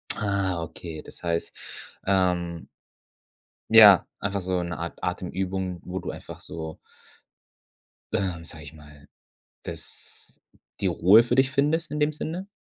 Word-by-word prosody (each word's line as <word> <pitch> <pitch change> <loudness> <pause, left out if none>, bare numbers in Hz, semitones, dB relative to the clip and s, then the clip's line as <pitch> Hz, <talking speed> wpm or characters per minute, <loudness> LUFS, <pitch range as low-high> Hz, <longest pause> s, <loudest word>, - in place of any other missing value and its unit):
Ah, 100 -4 -1
okay. 80 0 -7
Das - - -15
heißt, 85 -1 -1 0.5
ähm 90 -3 0 1.0
ja, 105 -4 +9
einfach 100 0 -2
so 90 -1 -1
'ne 85 -1 -4
Art 85 +1 -6
Atemübung, 95 -1 -3
wo 95 +1 -4
du - - -5
einfach - - -10
so 80 -1 -7 1.4
ähm, 90 -4 -1
sage 80 -1 -9
ich 75 +1 -10
mal, 75 -2 -16 0.6
das - - -9 0.5
die - - +1
Ruhe 105 +6 +6
für 120 +1 0
dich 130 0 +3
findest 150 +3 +1
in 150 - -2
dem 150 +1 +2
Sinne? 175 +6 -5
95 Hz, 135 wpm, -26 LUFS, 85-110 Hz, 1.4 s, ja